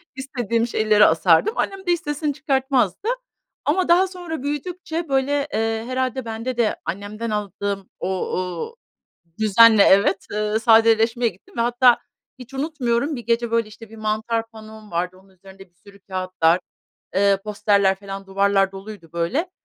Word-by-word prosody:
İstediğim 240 Hz, -4 st, -2 dB
şeyleri 215 Hz, -2 st, +4 dB
asardım. 170 Hz, -, +3 dB
Annem 390 Hz, -, -1 dB
de -, -, +3 dB
hiç 345 Hz, -, +2 dB
sesini 295 Hz, 0 st, -2 dB
çıkartmazdı 265 Hz, -, 0 dB, 0.6 s
ama 355 Hz, +5 st, +1 dB
daha 355 Hz, +3 st, +5 dB
sonra 350 Hz, -6 st, -7 dB
büyüdükçe, 325 Hz, +2 st, -4 dB
böyle, 275 Hz, +2 st, +1 dB
eee, 225 Hz, 0 st, -1 dB
herhâlde 255 Hz, 0 st, -2 dB
bende 230 Hz, +2 st, -4 dB
de 230 Hz, -3 st, +1 dB
annemden 205 Hz, +4 st, -5 dB
aldığım 200 Hz, -1 st, -3 dB
o -, -, -3 dB, 0.3 s
o 180 Hz, -, -4 dB, 0.6 s
düzenle 220 Hz, 0 st, +6 dB
Evet, 195 Hz, 0 st, +4 dB
eee, 210 Hz, +1 st, 0 dB
sadeleşmeye 225 Hz, +1 st, +4 dB
gittim 190 Hz, +3 st, -20 dB
ve 230 Hz, -, +2 dB
hatta, 245 Hz, +1 st, +4 dB, 0.4 s
hiç 250 Hz, +2 st, -12 dB
unutmuyorum, 275 Hz, -1 st, -1 dB
bir 240 Hz, -, -6 dB
gece, 235 Hz, 0 st, 0 dB
böyle, 230 Hz, -2 st, +1 dB
işte, 220 Hz, +1 st, -13 dB
1 225 Hz, -, -13 dB
mantar 220 Hz, +1 st, -2 dB
panom 220 Hz, -1 st, -13 dB
vardı, 180 Hz, +2 st, -2 dB
onun 195 Hz, -, -24 dB
üzerinde 190 Hz, 0 st, -16 dB
bir 175 Hz, -, -45 dB
sürü 200 Hz, 0 st, -16 dB
kâğıtlar, 185 Hz, -3 st, 0 dB, 0.6 s
eee, 200 Hz, 0 st, +3 dB
posterler, 205 Hz, -2 st, +2 dB
filan, 195 Hz, 0 st, -8 dB
duvarlar 195 Hz, 0 st, +2 dB
doluydu, 195 Hz, -3 st, -10 dB
böyle. 245 Hz, -, -1 dB
225 Hz, 150 wpm, -22 LUFS, 200-260 Hz, 0.6 s, düzenle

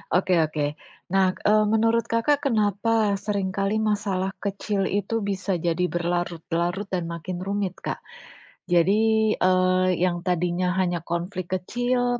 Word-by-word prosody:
Oke 185 Hz, 0 st, +2 dB
oke. 155 Hz, -1 st, -1 dB, 0.5 s
Nah, 190 Hz, -1 st, +3 dB
eee, 215 Hz, +1 st, +5 dB
menurut 225 Hz, +1 st, +2 dB
Kakak 280 Hz, +6 st, +1 dB
kenapa 215 Hz, -2 st, +1 dB
sering 200 Hz, -2 st, -2 dB
kali 195 Hz, +2 st, 0 dB
masalah 200 Hz, -3 st, 0 dB
kecil 200 Hz, 0 st, -2 dB
itu 205 Hz, +3 st, -1 dB
bisa 195 Hz, -2 st, -2 dB
jadi 170 Hz, +1 st, 0 dB
berlarut-larut 175 Hz, +2 st, -2 dB
dan 175 Hz, -3 st, -3 dB
makin 175 Hz, +2 st, -5 dB
rumit 195 Hz, -1 st, -2 dB
Kak? -, -, -5 dB, 0.7 s
Jadi, 215 Hz, +5 st, +3 dB
eee, 185 Hz, 0 st, +3 dB
yang 175 Hz, 0 st, 0 dB
tadinya 180 Hz, +1 st, 0 dB
hanya 180 Hz, -2 st, 0 dB
konflik 175 Hz, +2 st, -4 dB
kecil, 245 Hz, +5 st, 0 dB
190 Hz, 130 wpm, -24 LUFS, 175-210 Hz, 0.7 s, eee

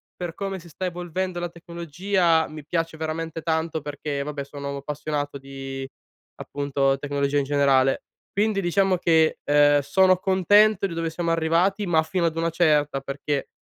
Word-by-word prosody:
per 175 Hz, -2 st, -5 dB
come 195 Hz, +1 st, -4 dB
si 170 Hz, -, -14 dB
sta 185 Hz, +4 st, -5 dB
evolvendo 180 Hz, +1 st, -3 dB
la 175 Hz, 0 st, -3 dB
tecnologia 170 Hz, 0 st, 0 dB
mi 155 Hz, -2 st, -10 dB
piace 165 Hz, 0 st, -2 dB
veramente 160 Hz, +1 st, -4 dB
tanto 160 Hz, -1 st, -1 dB
perché, 145 Hz, -1 st, -4 dB
vabbè, 145 Hz, -1 st, -4 dB
sono 140 Hz, 0 st, -6 dB
appassionato 145 Hz, 0 st, -4 dB
di, 135 Hz, 0 st, -7 dB, 0.5 s
appunto, 140 Hz, -1 st, 0 dB
tecnologia 140 Hz, 0 st, -1 dB
in 140 Hz, -, +2 dB
generale. 135 Hz, -2 st, +3 dB, 0.3 s
Quindi 205 Hz, 0 st, +1 dB
diciamo 190 Hz, +1 st, +2 dB
che, 160 Hz, -2 st, +3 dB
uhm, 145 Hz, 0 st, +5 dB
sono 185 Hz, +5 st, +4 dB
contento 195 Hz, +2 st, +4 dB
di 175 Hz, -, -3 dB
dove 165 Hz, 0 st, -2 dB
siamo 165 Hz, +1 st, -2 dB
arrivati, 175 Hz, +5 st, +1 dB
ma 160 Hz, -2 st, +3 dB
fino 170 Hz, +2 st, -1 dB
ad 165 Hz, -1 st, -1 dB
una 165 Hz, 0 st, +1 dB
certa 150 Hz, -4 st, +2 dB
perché 140 Hz, +1 st, -3 dB
160 Hz, 160 wpm, -24 LUFS, 145-175 Hz, 0.5 s, uhm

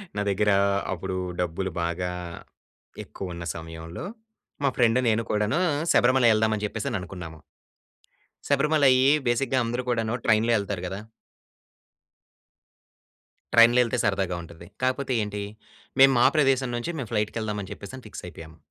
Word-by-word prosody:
నా 105 Hz, -, -1 dB
దగ్గర 105 Hz, +1 st, +1 dB, 0.4 s
అప్పుడు, 95 Hz, +1 st, -4 dB, 0.2 s
డబ్బులు 90 Hz, +2 st, -2 dB
బాగా 90 Hz, +1 st, -2 dB, 0.9 s
ఎక్కువ 95 Hz, -2 st, -7 dB
ఉన్న 85 Hz, 0 st, -7 dB
సమయంలో, 80 Hz, -, -8 dB, 0.6 s
మా 140 Hz, -, +4 dB
ఫ్రెండ్ 120 Hz, 0 st, +4 dB
నేను 110 Hz, +1 st, +1 dB
కూడాను 105 Hz, +9 st, +1 dB, 0.3 s
శబరిమలై 125 Hz, -1 st, +4 dB
ఎళ్దాం 110 Hz, 0 st, +2 dB
అని 105 Hz, 0 st, -3 dB
చెప్పేసననుకున్నాము... 90 Hz, -6 st, -5 dB, 1.1 s
శబరిమలై 140 Hz, -1 st, +4 dB, 0.3 s
బేసిక్‌గా 130 Hz, +2 st, +1 dB
అందరూ 120 Hz, +2 st, -2 dB
కూడాను 115 Hz, -2 st, 0 dB
ట్రైన్‌లో 110 Hz, +1 st, +3 dB
ఎళ్తారు 100 Hz, -3 st, -4 dB
కదా... 95 Hz, +2 st, -5 dB, 2.5 s
ట్రైన్‌లో 115 Hz, +1 st, +7 dB
ఎళ్తే 120 Hz, +1 st, -2 dB
సరదాగా 95 Hz, -3 st, 0 dB
ఉంటది. 85 Hz, +1 st, -13 dB, 0.2 s
కాకపోతే 130 Hz, +1 st, 0 dB
ఏంటి. 105 Hz, 0 st, -4 dB, 0.6 s
మేము 135 Hz, 0 st, +8 dB
మా -, -, +5 dB
ప్రదేశం 135 Hz, -3 st, +2 dB
నుంచి 120 Hz, +6 st, -3 dB
మేము 130 Hz, -7 st, -5 dB
ఫ్లైట్‌కెళ్దామని 105 Hz, -2 st, -2 dB
చెప్పేసి 100 Hz, +5 st, -9 dB
అని 130 Hz, -, -11 dB
ఫిక్సైయిపోయాము. 80 Hz, -5 st, -10 dB
110 Hz, 120 wpm, -25 LUFS, 95-125 Hz, 2.5 s, మేము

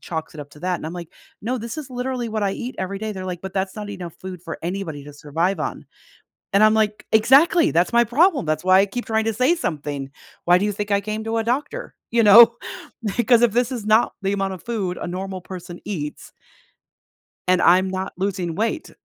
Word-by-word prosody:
chalks 160 Hz, -2 st, -5 dB
it 155 Hz, -, -7 dB
up 145 Hz, 0 st, -10 dB
to 150 Hz, -, -16 dB
that, 180 Hz, +1 st, -1 dB
and -, -, -10 dB
I'm, 160 Hz, -, -5 dB
like, 175 Hz, -2 st, -7 dB, 0.3 s
"No, 245 Hz, +5 st, -2 dB
this 235 Hz, +6 st, -6 dB
is 295 Hz, -3 st, -6 dB
literally 250 Hz, -1 st, -3 dB
what 215 Hz, -1 st, -2 dB
I 195 Hz, -1 st, +1 dB
eat 245 Hz, +5 st, -5 dB
every 190 Hz, +1 st, -3 dB
day." 220 Hz, +2 st, -4 dB
But 215 Hz, -, -4 dB
they're, 190 Hz, -1 st, -6 dB
like, 180 Hz, -2 st, -5 dB
"But 190 Hz, 0 st, -8 dB
that's 190 Hz, -1 st, -2 dB
not 210 Hz, -1 st, -6 dB
enough 180 Hz, -4 st, -7 dB
food 185 Hz, -2 st, -9 dB
for 165 Hz, -3 st, -6 dB
anybody 170 Hz, -5 st, -4 dB
to 145 Hz, -, -11 dB
survive 160 Hz, +6 st, -1 dB
on," -, -, -4 dB, 0.7 s
and 200 Hz, +2 st, +5 dB
I'm, 215 Hz, 0 st, +6 dB
like, 215 Hz, -1 st, 0 dB
"Exactly, 280 Hz, +10 st, +5 dB
that's 170 Hz, +2 st, +2 dB
my 235 Hz, 0 st, +5 dB
problem 285 Hz, -, +3 dB
that's 155 Hz, +1 st, -1 dB
why 185 Hz, +1 st, +6 dB
I 195 Hz, -, +4 dB
keep 240 Hz, +5 st, -5 dB
trying 220 Hz, 0 st, 0 dB
to 225 Hz, -, 0 dB
say 255 Hz, +9 st, +3 dB
something. 145 Hz, -, -4 dB, 0.4 s
Why 175 Hz, +1 st, +6 dB
do 200 Hz, -, 0 dB
you 210 Hz, -, 0 dB
think 205 Hz, +1 st, -4 dB
I 200 Hz, 0 st, +3 dB
came 215 Hz, +2 st, -4 dB
to 225 Hz, 0 st, -1 dB
a -, -, -1 dB
doctor?" 290 Hz, -, -3 dB, 0.2 s
You 230 Hz, 0 st, +3 dB
know? 230 Hz, +3 st, +9 dB, 0.6 s
Because 240 Hz, 0 st, +4 dB
if 240 Hz, -2 st, +4 dB
this 240 Hz, +2 st, +1 dB
is 235 Hz, -5 st, -5 dB
not 215 Hz, +2 st, +3 dB
the 195 Hz, 0 st, 0 dB
amount 195 Hz, -1 st, -1 dB
of 180 Hz, -3 st, -10 dB
food 200 Hz, -7 st, -3 dB
a -, -, -5 dB
normal 185 Hz, +1 st, -5 dB
person 180 Hz, -1 st, -9 dB
eats 150 Hz, -8 st, -6 dB, 1.2 s
and 185 Hz, 0 st, +3 dB
I'm 185 Hz, +2 st, +5 dB
not 190 Hz, 0 st, -4 dB
losing 185 Hz, -3 st, -2 dB
weight." 225 Hz, -, -2 dB
200 Hz, 235 wpm, -22 LUFS, 180-230 Hz, 1.2 s, know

